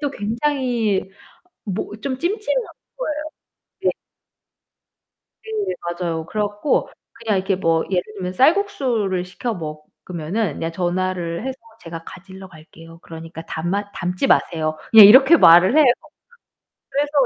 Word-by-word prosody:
또 285 Hz, -2 st, -1 dB
굉장히 230 Hz, -4 st, -1 dB, 0.5 s
뭐 200 Hz, 0 st, -4 dB
좀 260 Hz, -2 st, -3 dB
찜찜한 425 Hz, -, -1 dB, 0.3 s
거예요. 305 Hz, -11 st, -3 dB, 0.6 s
네. -, -, +3 dB, 1.5 s
네, 435 Hz, -, -3 dB, 0.2 s
맞아요. 165 Hz, -2 st, -3 dB
그래 210 Hz, +3 st, -2 dB
갖고 205 Hz, +7 st, -1 dB, 0.2 s
그냥 225 Hz, -3 st, -2 dB
이렇게 190 Hz, 0 st, -1 dB
뭐 165 Hz, -3 st, +1 dB
예를 180 Hz, -2 st, +1 dB
들면 185 Hz, -2 st, -4 dB
쌀국수를 250 Hz, -, +1 dB
시켜 215 Hz, +6 st, -4 dB
먹으면은 160 Hz, +3 st, -5 dB
그냥 165 Hz, 0 st, -4 dB
전화를 175 Hz, 0 st, -2 dB
해서 265 Hz, 0 st, -5 dB, 0.2 s
"제가 165 Hz, -1 st, -9 dB
가지러 190 Hz, +1 st, -12 dB
갈게요. 165 Hz, 0 st, -15 dB
그러니까 165 Hz, 0 st, -9 dB
담아 195 Hz, +5 st, -3 dB
담지 180 Hz, 0 st, -2 dB
마세요." 155 Hz, -1 st, +1 dB
그냥 220 Hz, -3 st, +11 dB
이렇게 265 Hz, +9 st, +8 dB
말을 180 Hz, -, +6 dB
해요. 310 Hz, -, +7 dB, 1.1 s
그래서 290 Hz, +1 st, -1 dB
190 Hz, 275 characters per minute, -20 LUFS, 170-255 Hz, 1.5 s, 그냥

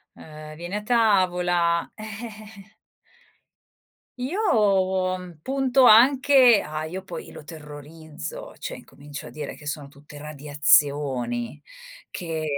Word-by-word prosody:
ehm, 155 Hz, 0 st, -11 dB
vieni 175 Hz, +4 st, -6 dB
a 210 Hz, -, -2 dB
tavola. 180 Hz, -7 st, +2 dB
Eh. 215 Hz, -1 st, -10 dB, 1.4 s
Io 190 Hz, -, 0 dB
punto 265 Hz, -, +2 dB
anche 255 Hz, 0 st, +6 dB
ah, 155 Hz, +1 st, -5 dB
io 175 Hz, +4 st, -5 dB
poi 190 Hz, -, -9 dB
lo -, -, -12 dB
terrorizzo, 155 Hz, -, -9 dB
cioè -, -, -6 dB
incomincio 145 Hz, 0 st, -11 dB
a -, -, -9 dB
dire 150 Hz, -2 st, -7 dB
che 150 Hz, -, -15 dB
sono 145 Hz, -1 st, -5 dB
tutte 145 Hz, +1 st, -15 dB
radiazioni 145 Hz, -4 st, 0 dB, 0.5 s
che 165 Hz, -3 st, -5 dB
175 Hz, 105 wpm, -24 LUFS, 150-215 Hz, 1.4 s, anche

